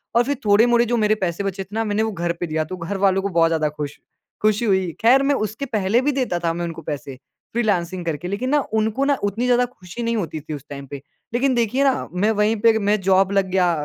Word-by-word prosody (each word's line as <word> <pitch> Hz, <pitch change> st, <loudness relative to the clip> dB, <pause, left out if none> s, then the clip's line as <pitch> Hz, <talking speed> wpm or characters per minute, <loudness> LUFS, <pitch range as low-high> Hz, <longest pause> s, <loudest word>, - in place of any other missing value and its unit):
और 235 Hz, -, +5 dB
फिर 285 Hz, +3 st, -1 dB
थोड़े-मोड़े 235 Hz, +3 st, +4 dB
जो 240 Hz, +1 st, 0 dB
मेरे 215 Hz, 0 st, +3 dB
पैसे 175 Hz, +3 st, -3 dB
बचे 195 Hz, -1 st, -3 dB
थे -, -, -22 dB
ना, 225 Hz, -, +1 dB
मैंने 210 Hz, 0 st, 0 dB
वो 220 Hz, -, -1 dB
घर 170 Hz, -2 st, -2 dB
पे 175 Hz, -, -2 dB
दिया, 155 Hz, 0 st, -1 dB
तो 185 Hz, +4 st, -7 dB
घर 180 Hz, +4 st, -4 dB
वालों 195 Hz, -1 st, +2 dB
को 200 Hz, -, -2 dB
बहुत 165 Hz, -2 st, +3 dB
ज़्यादा 155 Hz, -2 st, +1 dB
खुश 150 Hz, -1 st, -6 dB, 0.4 s
खुशी 215 Hz, +2 st, +2 dB
हुई। 190 Hz, -4 st, +1 dB
ख़ैर, 255 Hz, +4 st, +5 dB
मैं 280 Hz, 0 st, +2 dB
उसके 215 Hz, +4 st, -3 dB
पहले 220 Hz, -2 st, +1 dB
भी 290 Hz, +2 st, +1 dB
देता 255 Hz, -10 st, -1 dB
था 170 Hz, -1 st, -1 dB
मैं 175 Hz, +1 st, -3 dB
उनको 165 Hz, -2 st, -6 dB
पैसे 140 Hz, -2 st, -6 dB, 0.4 s
फ्रीलांसिंग 185 Hz, -6 st, -1 dB
करके, 165 Hz, +1 st, -3 dB
लेकिन 205 Hz, +7 st, -2 dB
ना 295 Hz, 0 st, +3 dB
उनको 220 Hz, +5 st, +1 dB
ना 285 Hz, 0 st, +3 dB
उतनी 210 Hz, +5 st, -1 dB
ज़्यादा 250 Hz, 0 st, +3 dB
खुशी 235 Hz, -3 st, -9 dB
नहीं 230 Hz, 0 st, 0 dB
होती 160 Hz, -6 st, -3 dB
थी 155 Hz, +1 st, -7 dB
उस 145 Hz, -1 st, -8 dB
टाइम 140 Hz, -1 st, -8 dB
पे। 140 Hz, 0 st, -8 dB, 0.3 s
लेकिन 260 Hz, +1 st, +2 dB
देखिए 240 Hz, +4 st, +1 dB
ना, 270 Hz, -2 st, +1 dB
मैं 205 Hz, +5 st, +2 dB
वहीं 210 Hz, +1 st, +2 dB
पे 230 Hz, -, +6 dB
एक 220 Hz, -, +3 dB
मैं 210 Hz, 0 st, +3 dB
जॉब 190 Hz, +1 st, +3 dB
लग 195 Hz, -1 st, +2 dB
गया 180 Hz, -1 st, +3 dB
205 Hz, 255 wpm, -21 LUFS, 175-235 Hz, 0.4 s, पे